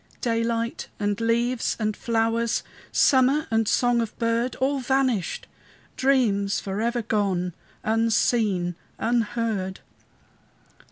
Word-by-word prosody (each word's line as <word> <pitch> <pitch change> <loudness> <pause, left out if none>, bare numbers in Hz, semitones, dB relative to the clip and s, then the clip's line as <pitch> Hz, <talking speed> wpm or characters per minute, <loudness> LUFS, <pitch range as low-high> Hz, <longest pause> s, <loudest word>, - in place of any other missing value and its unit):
Daylight 230 0 -1
and 205 +1 -1
leaves 235 +2 +1
and 215 -1 0
flowers, 230 0 0 0.3
Summer 275 +3 +4
and 225 -1 +2
song 245 +1 +3
of 225 - -5
bird! 230 +2 0
All 275 +1 0
vanished! 260 -7 0 0.5
dreams 220 -7 +2
forever 225 +5 -2
gone, 195 -5 0 0.3
Unseen, 220 -4 +1 0.2
unheard! 225 -4 -1
230 Hz, 95 wpm, -25 LUFS, 210-240 Hz, 0.5 s, Summer